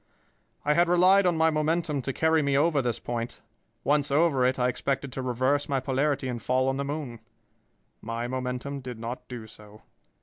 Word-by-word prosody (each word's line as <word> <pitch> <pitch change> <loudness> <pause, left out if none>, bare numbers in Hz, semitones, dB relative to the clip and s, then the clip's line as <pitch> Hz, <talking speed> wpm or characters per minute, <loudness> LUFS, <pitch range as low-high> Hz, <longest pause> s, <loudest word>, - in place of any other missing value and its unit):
"I 150 - +4
had 170 +2 +3
relied 185 +2 +5
on 175 -2 +1
my 160 0 +4
momentum 155 -1 0
to 135 - -3
carry 160 +3 +2
me 140 -1 +1
over 150 -1 +3
this 120 -3 -1
point. 120 0 -4 0.4
Once 145 0 +2
over 140 -2 +3
it, 130 - 0
I 125 -1 +2
expected 135 +2 -2
to 130 - -4
reverse 130 +4 0
my 135 -1 +1
polarity 135 +1 0
and 120 -2 -4
fall 130 +3 +1
on 135 - -1
the 140 - -1
moon. 140 -5 -5 0.8
My 115 +2 -4
momentum 130 +2 -4
did 125 -3 -7
not 120 +2 -6
do 120 -3 -7
so. 105 0 -15
135 Hz, 190 wpm, -27 LUFS, 125-150 Hz, 0.8 s, relied